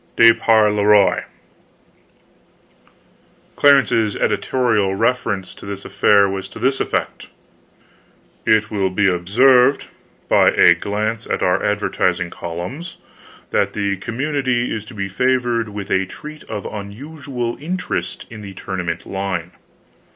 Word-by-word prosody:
DE 115 0 +8
PAR 110 -2 +3
LE 105 -1 0
ROI 105 -1 +4 2.3
Clarence's 120 -7 +4
editorial 105 -2 0
reference 115 -4 -1
to - - -16
this 100 0 -7
affair 100 -1 +4
was 95 -1 -5
to - - -12
this 130 +3 0
effect: - - -3 1.1
It 110 0 +2
will 100 -3 0
be 95 +1 +1
observed, 125 +9 +3 0.4
by - - +4
a 85 - +6
gl7nce 105 +5 -3
at - - -1
our 90 +1 +1
advertising 90 -4 0
columns, 90 - -7 0.5
that - - +1
the 100 -1 -1
commu 130 +10 -4
nity 125 -2 0
is 110 -2 -4
to 120 - -12
be 100 -1 -3
favored 120 +2 0
with 100 -1 -7
a 95 0 +1
treat 150 +9 -10
of 100 - -6
un 100 -1 -6
usual 130 -1 -5
interest 180 +4 -4
in 110 -1 -9
the 100 -2 -9
tournament 90 -4 -4
line. 95 -3 -4
105 Hz, 130 wpm, -19 LUFS, 95-125 Hz, 2.3 s, DE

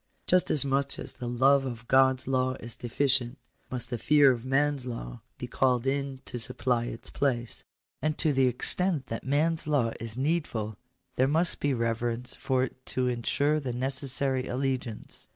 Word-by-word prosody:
Just 180 0 +4
as 145 -2 +5
much 140 0 +1
as - - -4
the 125 -2 -7
love 135 +3 +4
of 120 -3 -6
God's 130 -1 +3
law 130 -1 +1
is 115 -3 -6
deficient, 125 +1 +2 0.3
must 125 -1 -2
the 120 - -2
fear 145 0 +5
of 120 -2 -3
man's 135 0 +1
law - - -6 0.2
be - - -5
called 125 0 +1
in 135 -1 -2
to 120 - -5
supply 120 +1 +1
its 115 - -6
place. 120 -4 -1 0.4
And 155 0 0
to 155 - +1
the 130 -1 +3
extent 155 +5 0
that 115 - -4
man's 155 +4 0
law 135 -7 +1
is 115 0 -6
needful 130 -8 -1 0.4
there 130 - +4
must 165 +5 +1
be 145 - +1
reverence 115 +1 -2
for 130 -1 0
it 130 0 -6
to 130 -1 0
ensure 140 +5 +1
the 130 -4 -4
necessary 130 +1 -2
allegiance. 130 -3 -4
130 Hz, 170 wpm, -28 LUFS, 120-140 Hz, 0.4 s, as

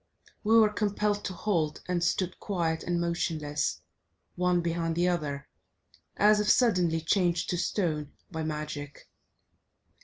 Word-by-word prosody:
We 225 +1 +5
were 215 -1 +4
compelled 205 -1 0
to 185 - -3
halt, 170 -6 -1
and 180 -1 0
stood 180 +1 0
quiet 170 -5 -1
and 175 -1 -1
motionless, 160 -3 -1 0.5
one 180 0 +2
behind 165 -1 -1
the 175 +1 +2
other, 150 -6 -2 0.7
as 210 +1 +5
if 210 0 +1
suddenly 180 -10 +3
changed 175 0 +1
to 175 - 0
stone 155 -6 -1 0.2
by 160 -2 -4
magic. 150 -2 -5
175 Hz, 130 wpm, -29 LUFS, 160-200 Hz, 0.7 s, We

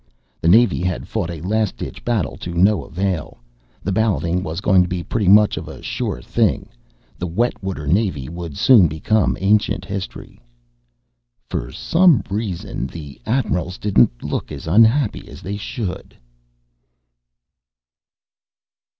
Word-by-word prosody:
The - - 0
Navy 110 +1 +5
had 90 -1 -2
fought 85 - -2
a 85 -3 -6
last 105 +3 -1
ditch - - -7
battle 115 -7 -1
to 85 -1 -6
no 95 -1 +3
avail. 90 -4 -3 0.5
The 100 - -1
balloting 95 -4 +1
was 85 -2 -4
going 95 -2 +4
to 90 - +1
be 90 -1 -3
pretty 105 +1 -1
much 105 +2 +6
of - - -5
a - - -10
sure - - -3
thing - - 0 0.5
the 90 - -2
wet 115 +9 -1
water 95 -6 -4
Navy 75 - 0
would 85 -3 -7
soon 115 -10 +6
become 90 +7 0
ancient 100 -1 +1
history. 95 -9 -7 1.1
For - - -3
some 170 - +3
reason 100 -4 -3
the 75 -4 -10
admirals 95 -7 -1
didn't 65 -12 +2
look - - -3
as 70 -2 -7
unhappy 115 - +3
as - - -12
they 100 +2 -4
should. 100 -2 -6
95 Hz, 140 wpm, -20 LUFS, 85-105 Hz, 1.1 s, much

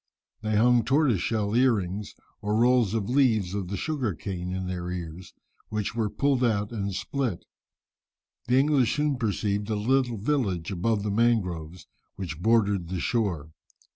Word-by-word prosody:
They 110 -1 -1
hung 120 +2 +4
tortoiseshell 115 - +1
earrings 105 -6 +1 0.3
or 105 +1 -1
rolls 120 -2 +3
of 110 -3 0
the 120 - -4
leaves 110 -9 +3
of 100 -3 -3
the 100 +2 -4
sugar 130 - -2
cane 90 +1 -5
in 95 0 -3
their 90 -1 -4
ears, 90 0 -7 0.3
which 105 -2 -2
were 110 -2 -1
pulled 135 +2 +1
out 105 -3 +1
and 100 -3 -3
split. 120 0 -3 1.0
The 125 +2 +3
English 135 -4 +3
soon 150 -2 0
perceived 105 -2 -1
a 110 - 0
little 120 +2 +1
village 100 - -1
above 100 +3 0
the 105 - -1
mangroves 90 -7 0 0.3
which 90 -5 -6
bordered 100 -5 +2
the 95 -1 -3
shore. 85 -9 -1
105 Hz, 155 wpm, -26 LUFS, 95-120 Hz, 1.0 s, hung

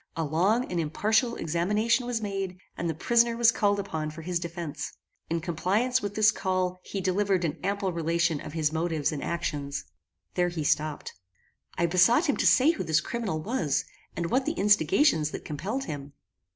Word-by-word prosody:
A 165 - 0
long 185 - +2
and 175 - -1
impartial 220 - +1
examination 210 +9 +1
was 230 -3 -2
made, 195 -2 -3 0.2
and 170 - -2
the 160 - -2
prisoner 235 +6 +2
was 235 -1 +6
called 205 -3 +1
upon 160 -6 -3
for 160 +1 -9
his 175 0 -1
defence. 165 -3 -5 0.4
In 165 - 0
compliance 200 +10 0
with 205 0 -4
this 215 -1 +5
call 185 -2 -1
he 200 - -5
delivered 190 -1 +1
an 155 - -3
ample 195 -1 -1
relation 170 -1 0
of - - -8
his 155 -2 0
motives 160 -2 0
and 150 - -4
actions." 145 -4 -3 0.5
There 175 0 +1
he 170 -3 -4
stopped. 150 +1 -1 0.6
I 170 - +2
besought 185 - +4
him 285 - +1
to - - +2
say 275 +5 +6
who 335 - -4
this 160 -1 +2
criminal 190 -4 -3
was, 175 - 0 0.3
and 170 -1 -2
what 260 +1 +1
the - - +1
instigations 195 - +3
that - - -7
compelled 205 - -3
him. 145 - -7
180 Hz, 180 wpm, -27 LUFS, 160-210 Hz, 0.6 s, was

